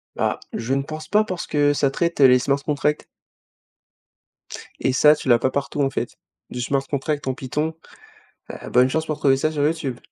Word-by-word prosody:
Bah, -, -, -1 dB
je 115 Hz, +3 st, -2 dB
ne 135 Hz, -, +1 dB
pense 155 Hz, +1 st, -8 dB
pas 210 Hz, +5 st, +3 dB
parce 185 Hz, -5 st, -5 dB
que 145 Hz, -1 st, +2 dB
ça 140 Hz, -1 st, +1 dB
traite 170 Hz, +4 st, -2 dB
les 130 Hz, -2 st, +7 dB
Smart 140 Hz, +2 st, 0 dB
Contracts 150 Hz, 0 st, -1 dB, 1.7 s
et 130 Hz, -, 0 dB
ça, 150 Hz, +3 st, +6 dB
tu 150 Hz, -, -8 dB
l'as 120 Hz, -1 st, +6 dB
pas 130 Hz, -, 0 dB
partout, 140 Hz, +1 st, -2 dB
en 135 Hz, -, +2 dB
fait, -, -, -4 dB, 0.3 s
du 125 Hz, -, -5 dB
Smart 135 Hz, +2 st, 0 dB
Contracts 145 Hz, 0 st, -3 dB
en 130 Hz, -, 0 dB
Python, 150 Hz, +5 st, -3 dB, 0.8 s
heu, -, -, -8 dB
bonne 125 Hz, +1 st, +4 dB
chance 160 Hz, +4 st, -1 dB
pour 155 Hz, -1 st, -3 dB
trouver 135 Hz, -2 st, +3 dB
ça 155 Hz, +4 st, -1 dB
sur 145 Hz, -2 st, -2 dB
Youtube. 150 Hz, -5 st, -1 dB
145 Hz, 195 wpm, -22 LUFS, 135-155 Hz, 1.7 s, les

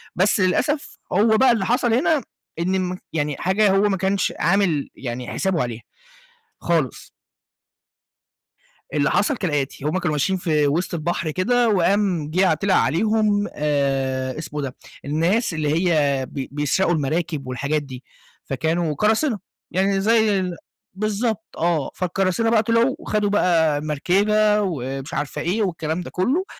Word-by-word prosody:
بس 195 Hz, +3 st, +2 dB
للأسف 280 Hz, +11 st, 0 dB, 0.2 s
هو 220 Hz, +3 st, +4 dB
بقى 260 Hz, +1 st, +5 dB
اللي 220 Hz, -5 st, 0 dB
حصل 240 Hz, +1 st, +1 dB
هنا 280 Hz, +4 st, +2 dB, 0.4 s
إن 185 Hz, +2 st, 0 dB
مك 180 Hz, 0 st, -4 dB
يعني 145 Hz, -2 st, -1 dB
حاجة 195 Hz, +2 st, +2 dB
هو 195 Hz, -, +4 dB
ما 195 Hz, -, 0 dB
كانش 190 Hz, +1 st, 0 dB
عامل 170 Hz, -4 st, +1 dB
يعني 125 Hz, -1 st, -5 dB
حسابه 190 Hz, -4 st, -1 dB
عليها 120 Hz, -2 st, -4 dB, 0.8 s
خالص. 160 Hz, -8 st, -1 dB, 1.8 s
اللي 145 Hz, -1 st, +1 dB
حصل 235 Hz, +5 st, +1 dB
كالآتي، 145 Hz, -5 st, -2 dB
هُم 155 Hz, +4 st, 0 dB
كانوا 175 Hz, -3 st, -1 dB
ماشيين 185 Hz, +6 st, +1 dB
في 155 Hz, -4 st, +1 dB
وِسط 170 Hz, +6 st, -1 dB
البحر 170 Hz, -1 st, -2 dB
كده، 235 Hz, +7 st, +2 dB
وقام 185 Hz, -4 st, +1 dB
جِه 185 Hz, +3 st, +3 dB
ع -, -, +4 dB
طِلِع 185 Hz, +4 st, +1 dB
عليهم 210 Hz, +2 st, +2 dB
آآ 135 Hz, -3 st, -1 dB
اسمه 150 Hz, -1 st, -5 dB
إيه 140 Hz, -, -2 dB
ده، -, -, -16 dB, 0.3 s
الناس 170 Hz, -, +1 dB
اللي 155 Hz, +3 st, 0 dB
هي 140 Hz, -4 st, +1 dB
بي 135 Hz, -2 st, -5 dB
بيسرقوا 150 Hz, +5 st, +1 dB
المراكب 155 Hz, -1 st, -2 dB
والحاجات 140 Hz, +4 st, -1 dB
دي، 130 Hz, -2 st, -10 dB, 0.4 s
فكانوا 160 Hz, +4 st, -1 dB
قراصنة 220 Hz, -, +1 dB, 0.3 s
يعني 195 Hz, +1 st, +1 dB
زي 220 Hz, -1 st, +3 dB
ال 180 Hz, -2 st, -3 dB, 0.4 s
بالضبط 215 Hz, +2 st, -1 dB
آه، 165 Hz, -4 st, 0 dB
فالقراصنة 185 Hz, +4 st, 0 dB
بقى 225 Hz, -1 st, +3 dB
طلعوا، 230 Hz, +4 st, +2 dB
وخدوا 210 Hz, -1 st, -1 dB
بقى 165 Hz, -7 st, +2 dB
مركبة 205 Hz, +8 st, +2 dB
ومش 135 Hz, -6 st, -4 dB
عارفة 145 Hz, -, -3 dB
إيه 185 Hz, +7 st, 0 dB
والكلام 165 Hz, -2 st, -2 dB
ده -, -, -7 dB
كُلّه. 270 Hz, -, 0 dB
180 Hz, 145 wpm, -22 LUFS, 150-205 Hz, 1.8 s, بقى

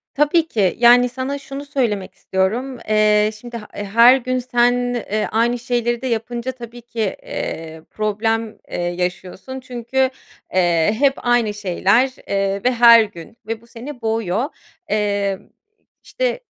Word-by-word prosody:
Tabii 300 Hz, +3 st, +3 dB
ki. 200 Hz, -, +1 dB
Yani, 245 Hz, +1 st, +6 dB
sana 260 Hz, +3 st, -4 dB
şunu 275 Hz, 0 st, -8 dB
söylemek 235 Hz, -9 st, -2 dB
istiyorum. 230 Hz, +8 st, -2 dB
Eee, 215 Hz, 0 st, +4 dB
şimdi 240 Hz, +1 st, -8 dB
ha 210 Hz, -2 st, -10 dB
her 230 Hz, +5 st, +5 dB
gün 255 Hz, 0 st, -2 dB
sen, 245 Hz, -1 st, +2 dB, 0.2 s
eee, 215 Hz, -3 st, -2 dB
aynı 235 Hz, +2 st, +1 dB
şeyleri 240 Hz, 0 st, -1 dB
de 260 Hz, -, -3 dB
yapınca 235 Hz, +1 st, -2 dB
tabii 240 Hz, -1 st, -11 dB
ki, 235 Hz, 0 st, -10 dB, 0.2 s
eee, 160 Hz, 0 st, -5 dB
problem, 220 Hz, +1 st, -1 dB
eee, -, -, -3 dB
yaşıyorsun. 180 Hz, +7 st, -4 dB
Çünkü, 260 Hz, +1 st, -1 dB, 0.4 s
eee, 175 Hz, +1 st, +2 dB
hep 280 Hz, -1 st, +4 dB
aynı 240 Hz, -3 st, +1 dB
şeyler, 205 Hz, +5 st, +2 dB, 0.2 s
eee, 195 Hz, 0 st, -1 dB
ve 250 Hz, -, +3 dB
her 235 Hz, -2 st, +7 dB
gün 205 Hz, +1 st, -11 dB
ve 225 Hz, 0 st, -4 dB
bu 235 Hz, -, -21 dB
seni 245 Hz, +3 st, -9 dB
boğuyor. 225 Hz, 0 st, -1 dB, 0.4 s
Eee, 200 Hz, -2 st, 0 dB, 0.6 s
işte, -, -, -2 dB
230 Hz, 140 wpm, -20 LUFS, 205-250 Hz, 0.6 s, her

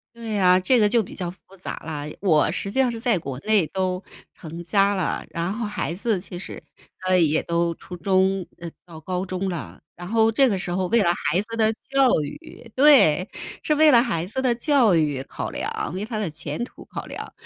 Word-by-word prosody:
对 230 Hz, -1 st, -6 dB
呀， 185 Hz, -3 st, +4 dB
这 240 Hz, +7 st, +3 dB
个 210 Hz, -, +4 dB
就 230 Hz, +1 st, +3 dB
比 190 Hz, -, -10 dB
较 180 Hz, -3 st, -4 dB
复 185 Hz, +2 st, -18 dB
杂 180 Hz, -, -6 dB
了。 150 Hz, -3 st, -5 dB, 0.2 s
我 155 Hz, -7 st, +3 dB
实 195 Hz, +4 st, -3 dB
际 265 Hz, -, 0 dB
上 260 Hz, -2 st, +3 dB
是 230 Hz, -, -5 dB
在 225 Hz, -3 st, +1 dB
国 135 Hz, -5 st, -6 dB
内 210 Hz, -2 st, +2 dB
都 185 Hz, -1 st, -2 dB, 0.3 s
成 165 Hz, 0 st, -9 dB
家 200 Hz, +2 st, +3 dB
了， 185 Hz, -4 st, -2 dB
然 170 Hz, +2 st, -2 dB
后 225 Hz, +1 st, -3 dB
孩 210 Hz, -5 st, -3 dB
子 205 Hz, +1 st, -1 dB
其 180 Hz, -1 st, -8 dB
实 185 Hz, -, -6 dB, 0.5 s
啊 185 Hz, -, +3 dB
也 160 Hz, -3 st, +3 dB
都 170 Hz, 0 st, 0 dB
初 180 Hz, -, -10 dB
中 190 Hz, +1 st, +1 dB
呃， 170 Hz, -, -7 dB, 0.2 s
到 170 Hz, -3 st, -12 dB
高 180 Hz, +3 st, -3 dB
中 185 Hz, 0 st, -3 dB
了， 175 Hz, -4 st, -6 dB
然 175 Hz, +1 st, -9 dB
后 225 Hz, +1 st, +3 dB
这 270 Hz, +4 st, +4 dB
个 200 Hz, -5 st, 0 dB
时 185 Hz, -, -4 dB
候 185 Hz, +1 st, 0 dB
为 230 Hz, +1 st, +3 dB
了 175 Hz, -3 st, +3 dB
孩 175 Hz, +1 st, 0 dB
子 230 Hz, +2 st, -7 dB
的 220 Hz, -1 st, +3 dB
教 270 Hz, -, +2 dB
育， 230 Hz, -, -10 dB
对！ 255 Hz, -, +5 dB, 0.3 s
是 305 Hz, -, +1 dB
为 310 Hz, 0 st, +6 dB
了 235 Hz, -2 st, +7 dB
孩 200 Hz, -10 st, -1 dB
子 220 Hz, +7 st, -3 dB
的 250 Hz, -2 st, +2 dB
教 245 Hz, -, +3 dB
育 145 Hz, -4 st, 0 dB
考 -, -, -6 dB
量， -, -, -4 dB
为 190 Hz, +3 st, -3 dB
他 220 Hz, 0 st, -4 dB
的 205 Hz, -6 st, -2 dB
前 155 Hz, +6 st, -5 dB
途 -, -, -13 dB
考 -, -, -7 dB
量， -, -, -8 dB
190 Hz, 235 characters per minute, -23 LUFS, 175-230 Hz, 0.5 s, 了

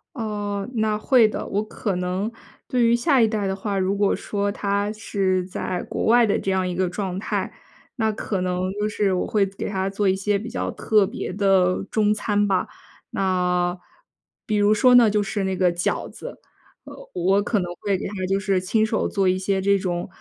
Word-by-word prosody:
哦， 205 Hz, -4 st, -3 dB
那 215 Hz, -1 st, +1 dB
会 235 Hz, 0 st, +4 dB
的。 215 Hz, -, -4 dB
我 205 Hz, -, -1 dB
可 210 Hz, -2 st, -3 dB
能 185 Hz, +5 st, -2 dB, 0.4 s
对 250 Hz, -2 st, +2 dB
于 235 Hz, +1 st, +4 dB
下 270 Hz, +1 st, +2 dB
一 225 Hz, -, +5 dB
代 215 Hz, -2 st, -1 dB
的 190 Hz, -, 0 dB
话， 200 Hz, 0 st, -3 dB
如 190 Hz, +1 st, +1 dB
果 200 Hz, 0 st, +2 dB
说 205 Hz, -1 st, -2 dB
他 200 Hz, 0 st, -1 dB
是 190 Hz, -4 st, -1 dB
在 185 Hz, -1 st, -4 dB
国 -, -, -2 dB
外 235 Hz, +1 st, +5 dB
的 205 Hz, -, +1 dB
这 195 Hz, -, -2 dB
样 190 Hz, -1 st, +1 dB
一 180 Hz, -, -2 dB
个 185 Hz, 0 st, 0 dB
状 185 Hz, 0 st, -3 dB
态， -, -, -2 dB, 0.5 s
那 220 Hz, -1 st, +1 dB
可 205 Hz, -2 st, -3 dB
能 180 Hz, +1 st, -1 dB
就 210 Hz, -, +1 dB
是 205 Hz, -2 st, 0 dB
我 180 Hz, -, -1 dB
会 205 Hz, -2 st, +2 dB
做 195 Hz, 0 st, -10 dB
给 -, -, -3 dB
他 190 Hz, -1 st, -1 dB
做 200 Hz, 0 st, -1 dB
一 190 Hz, -, +3 dB
些 200 Hz, +1 st, 0 dB
比 225 Hz, +3 st, -7 dB
较 245 Hz, -, -3 dB
特 210 Hz, -3 st, +2 dB
别 -, -, -5 dB
的 195 Hz, -2 st, +2 dB
中 210 Hz, -1 st, +2 dB
餐 205 Hz, -1 st, 0 dB
吧。 190 Hz, -2 st, +1 dB, 0.5 s
那 180 Hz, -2 st, 0 dB, 0.7 s
比 215 Hz, -4 st, -1 dB
如 205 Hz, +1 st, +4 dB
说 250 Hz, +4 st, +5 dB
呢， 235 Hz, -3 st, +7 dB
就 210 Hz, 0 st, +1 dB
是 200 Hz, 0 st, -2 dB
那 190 Hz, 0 st, -1 dB
个 180 Hz, -1 st, +2 dB
饺 175 Hz, -, -1 dB
子。 -, -, -10 dB, 0.5 s
呃， -, -, -10 dB, 0.2 s
我 190 Hz, +3 st, +2 dB
可 210 Hz, +1 st, 0 dB
能 175 Hz, -1 st, -4 dB
会 200 Hz, -2 st, 0 dB
给 -, -, -6 dB
他 -, -, -9 dB
就 195 Hz, +1 st, +1 dB
是 195 Hz, -2 st, 0 dB
亲 215 Hz, +4 st, +1 dB
手 220 Hz, 0 st, 0 dB
做 195 Hz, -2 st, 0 dB
一 185 Hz, 0 st, +2 dB
些 195 Hz, 0 st, 0 dB
这 200 Hz, +1 st, +3 dB
种， 180 Hz, -3 st, -2 dB
200 Hz, 230 characters per minute, -23 LUFS, 185-210 Hz, 0.7 s, 呢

